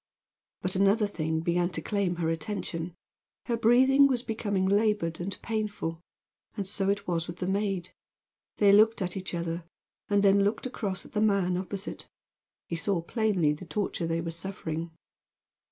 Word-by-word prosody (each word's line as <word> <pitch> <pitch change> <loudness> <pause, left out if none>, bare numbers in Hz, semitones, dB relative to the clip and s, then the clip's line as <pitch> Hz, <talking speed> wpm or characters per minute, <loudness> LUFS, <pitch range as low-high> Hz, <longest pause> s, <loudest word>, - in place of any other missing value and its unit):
But 185 +1 -1
another 200 +3 +4
thing 160 -5 -2
began 175 +1 +1
to - - -2
claim 200 -4 0
her 165 -1 -1
attention. 165 0 -4 0.5
Her 235 - 0
breathing 260 +5 +6
was 250 -3 0
becoming 205 -5 -1
labored 200 -4 +2
and 185 +2 -4
painful. 210 -7 -3 0.6
And 200 - -2
so 195 +1 0
it 200 0 -1
was 170 -2 -1
with 170 - -7
the 180 - -3
maid. 195 -2 -1 0.6
They 205 -1 +6
looked 215 +1 +5
at 180 -1 -3
each 185 -2 -4
other, 170 0 -3 0.5
and 205 -1 +3
then 200 0 +5
looked 205 +5 0
across 200 -7 -3
at - - -14
the 210 - 0
man 200 -4 +2
opposite. 190 +2 -5 0.6
He 170 - -4
saw 190 +1 0
plainly 190 -7 +1
the 160 +4 -9
torture 190 -3 -2
they 165 0 0
were 165 0 -4
suffering. 165 -2 -4
195 Hz, 165 wpm, -28 LUFS, 170-210 Hz, 0.6 s, breathing